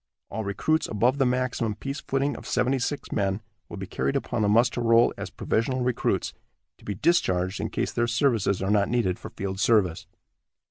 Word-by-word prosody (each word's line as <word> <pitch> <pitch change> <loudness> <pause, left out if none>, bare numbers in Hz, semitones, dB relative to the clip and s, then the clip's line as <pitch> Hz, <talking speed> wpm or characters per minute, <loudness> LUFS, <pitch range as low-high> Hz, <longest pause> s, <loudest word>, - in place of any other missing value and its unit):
All 110 - -3
recruits 155 +11 0
above 120 +6 +1
the 135 - +4
maximum 125 -3 -1
peace 140 +6 -5
footing 135 +1 -1
of - - -9
seventy 130 +2 +1
six 145 +4 -3
men 95 0 0 0.3
will - - -7
be 95 - -5
carried 70 -7 -2
upon - - -1
the 105 - +2
muster 120 +3 +3
roll 115 0 +4
as - - -6
provisional 125 +3 -1
recruits, 125 -1 0 0.5
to - - -19
be 100 - -3
discharged 95 - +1
in - - -2
case - - -2
their 120 0 0
services 115 -6 +1
are 95 - 0
not 100 -1 +3
needed 115 -7 0
for - - -8
field 95 0 -5
service." 100 -6 +2
115 Hz, 190 wpm, -26 LUFS, 100-125 Hz, 0.5 s, the